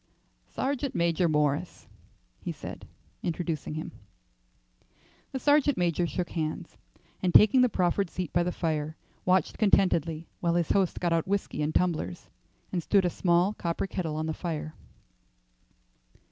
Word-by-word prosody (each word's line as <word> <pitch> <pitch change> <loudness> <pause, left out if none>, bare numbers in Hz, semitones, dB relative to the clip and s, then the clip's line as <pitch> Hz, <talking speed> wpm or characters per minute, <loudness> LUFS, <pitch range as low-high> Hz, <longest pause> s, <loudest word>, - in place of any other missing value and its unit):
"Sergeant 275 0 -2
Major 170 0 +2
Morris," 150 +2 0 0.5
he - - -4
said, - - -8 0.3
introducing 165 -3 -3
him. 155 - -5 1.4
The - - -3
sergeant 290 0 +3
major 175 -1 +1
shook 180 +1 -3
hands, 160 +1 -3 0.5
and 185 - +1
taking 215 +8 +7
the 250 - +5
proffered 185 -1 +1
seat 180 -2 -5
by 175 - +3
the 175 +1 0
fire, 155 -2 -2 0.3
watched 185 -2 +2
contentedly 170 -6 +2
while 170 -1 +1
his 170 -2 +1
host 190 -3 +1
got 175 -2 +1
out 165 +1 0
whiskey 195 -5 -1
and 150 +1 -1
tumblers 155 - -1 0.4
and 180 - -1
stood 195 +3 +3
a 175 - +1
small 175 +3 +2
copper 170 -2 -2
kettle 175 -5 -3
on 155 +1 -2
the 160 - -2
fire. 155 -2 -4
175 Hz, 145 wpm, -28 LUFS, 160-190 Hz, 1.4 s, taking